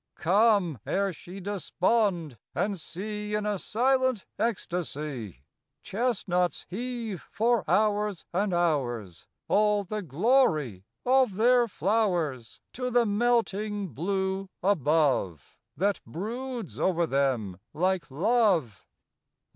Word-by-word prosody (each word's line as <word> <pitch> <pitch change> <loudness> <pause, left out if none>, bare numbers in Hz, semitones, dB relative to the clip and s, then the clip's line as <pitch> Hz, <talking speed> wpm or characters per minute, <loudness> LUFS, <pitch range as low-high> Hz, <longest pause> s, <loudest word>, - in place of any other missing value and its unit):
Come, 195 - +3
ere 195 -1 0
she 180 +4 -10
despond, 190 - 0 0.2
and 200 -2 -1
see 210 +5 -4
In 210 0 -1
a 205 -2 -1
silent 260 0 +1
ecstasy 150 - -3 0.4
Chestnuts 190 -6 -1
heave 230 -2 -5
for 230 +1 +2
hours 210 -3 +1
and 195 +3 +1
hours 125 - -1 0.2
All 210 0 +3
the 210 +2 -4
glory 155 - +2 0.2
of 255 -5 +3
their 240 +3 +4
flowers 180 - -1
To 250 0 -3
the 245 -1 +3
melting 210 -2 0
blue 190 - -2
above, 150 - +1 0.2
That 200 +4 +1
broods 235 - -5
over 175 -2 +2
them 130 - 0
like 180 -2 0
love. 170 - +1
195 Hz, 100 wpm, -28 LUFS, 160-220 Hz, 0.4 s, their